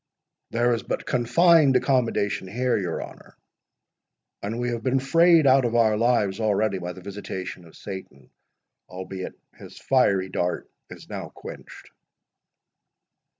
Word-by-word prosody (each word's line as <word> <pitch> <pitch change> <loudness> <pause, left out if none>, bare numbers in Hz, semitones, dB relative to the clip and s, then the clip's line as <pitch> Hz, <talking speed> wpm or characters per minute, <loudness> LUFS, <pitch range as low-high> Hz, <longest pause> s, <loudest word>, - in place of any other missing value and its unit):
There 120 +1 +2
is 115 - -2
but - - -4
confined 140 +4 +4
accommodation 115 -8 +1
here, 125 +6 0
your 90 -3 -2
honour—and 110 +4 -12
we 120 0 -1
have 120 -1 -3
been 130 +3 +1
frayed 165 +3 +4
out 135 0 +5
of 120 -1 -1
our 110 -2 +4
lives 110 -4 +1
already 105 -2 +1
by 90 0 -5
the 95 - -12
visitation 95 -2 -7
of 80 - -16
Satan—albeit 95 +2 -10 0.2
his - - -13
fiery 100 -8 +2
dart 90 -1 -2 0.2
is - - -12
now - - -6
quenched." - - -11
115 Hz, 125 wpm, -24 LUFS, 95-125 Hz, 0.2 s, out